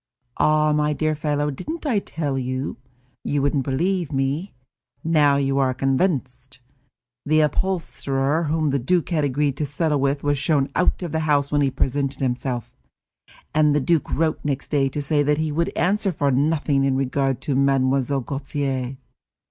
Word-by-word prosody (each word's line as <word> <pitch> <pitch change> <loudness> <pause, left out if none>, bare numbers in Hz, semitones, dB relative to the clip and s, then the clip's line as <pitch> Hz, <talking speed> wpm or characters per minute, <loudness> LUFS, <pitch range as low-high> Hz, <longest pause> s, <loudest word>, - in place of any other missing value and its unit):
Ah, 155 0 +3
my 150 0 +1
dear 155 +1 0
fellow, 150 -1 -1
didn't 315 - -6
I 240 -8 +2
tell 150 -7 -3
you? 130 0 -3 0.5
You 145 -1 0
wouldn't 140 -1 +1
believe 170 +5 -1
me; 140 +7 -2 0.5
now 150 -3 +4
you 135 0 +1
are 130 -1 +1
convinced. 130 -2 -1 0.7
The 155 +1 +3
upholsterer 155 -3 0
whom 155 -1 0
the 140 - +1
duke 175 +7 0
had 160 -4 +1
agreed 140 0 0
to 150 - -1
settle 150 +1 0
with 140 +1 0
was 145 -1 +1
shown 140 -1 +1
out 180 - +1
of 170 - -4
the 160 - 0
house 140 -1 +2
when 145 -1 +2
he 140 - +3
presented 135 +1 -1
himself, 125 -2 -3 0.8
and 150 -1 +3
the - - +3
duke 160 +3 +1
wrote 160 0 0
next 140 -2 -2
day 140 -2 +2
to 145 +2 -4
say 145 +1 +1
that 150 +1 +2
he 155 0 -1
would 170 +3 0
answer 200 +2 +1
for 145 -4 0
nothing 145 0 +1
in 135 -1 +2
regard 135 -1 0
to 145 - -1
Mlle. 135 0 +2
Gautier. 135 -1 -3
145 Hz, 170 wpm, -22 LUFS, 135-155 Hz, 0.8 s, now